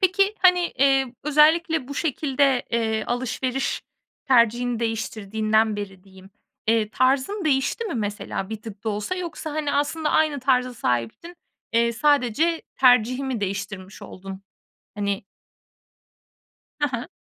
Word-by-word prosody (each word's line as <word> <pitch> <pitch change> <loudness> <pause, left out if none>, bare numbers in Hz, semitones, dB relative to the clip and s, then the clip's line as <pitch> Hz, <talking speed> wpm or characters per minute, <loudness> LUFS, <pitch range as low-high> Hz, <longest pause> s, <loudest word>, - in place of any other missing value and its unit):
Peki 395 +2 +3
hani, 360 -1 +5 0.2
eee, 270 -2 +3
özellikle 305 0 +3
bu 285 - -6
şekilde, 280 -3 +1
eee, 220 -2 0
alışveriş 255 +2 -2 0.5
tercihini 240 -1 +3
değiştirdiğinden 220 -1 0
beri 195 -2 -7
diyeyim, 190 0 -16 0.4
eee, 220 -1 +2
tarzın 270 - +1
değişti 285 - +1
mi 420 - -4
mesela 205 -3 -3
bir 220 -1 -6
tık 220 -1 -10
da - - -1
olsa 210 - -2
yoksa 340 -3 -5
hani 295 -1 -2
aslında 300 +2 0
aynı 305 -3 +2
tarza 255 -1 +1
sahiptin, 125 - -2 0.4
eee, 235 0 +3
sadece 290 +5 +2
tercihi 250 +1 +4
mi 260 -4 -3
değiştirmiş 195 -1 -5
oldun? 195 +1 -9 0.5
Hani. 200 -1 -2 1.6
Ha 295 - +2
ha. 235 -1 -4
250 Hz, 125 wpm, -24 LUFS, 215-290 Hz, 1.6 s, hani